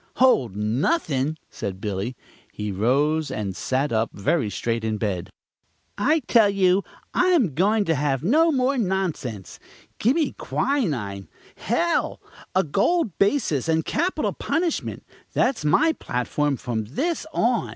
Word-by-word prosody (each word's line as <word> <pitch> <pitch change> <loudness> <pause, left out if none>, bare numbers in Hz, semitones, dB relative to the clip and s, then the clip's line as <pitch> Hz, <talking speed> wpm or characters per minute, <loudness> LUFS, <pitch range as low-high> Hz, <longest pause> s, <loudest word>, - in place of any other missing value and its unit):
"Hold 135 - +3
nothin'!" 135 - 0
said 95 -2 -5
Billy. 105 +4 -3 0.4
He 105 0 -4
arose 140 +9 +1
and 105 -7 -3
sat 135 +3 -1
up 110 0 +1
very 110 +4 0
straight 115 +2 -2
in 110 -1 -1
the - - -2
bed. 100 -5 -2 0.7
"I 300 +10 +2
tell 225 -6 +4
you 195 -1 +3 0.3
I 360 - +3
am 280 - +3
goin' 205 +7 +2
to 165 - +2
have 140 -2 0
no 315 - +4
more 265 -1 +1
nonsense. 180 - -2 0.4
Gimme 285 +8 +2
quinine, 125 - -1 0.3
hell, - - 0 0.4
a 190 - +4
gold 230 - +1
basis, 195 - +1
and 160 0 +2
capital 345 +5 0
punishment! 335 0 -2 0.3
That's 255 - +1
my 315 - +3
platform 140 - -1
from 115 -3 -3
this 310 - -2
on. 235 -3 +1
155 Hz, 135 wpm, -24 LUFS, -, 0.7 s, tell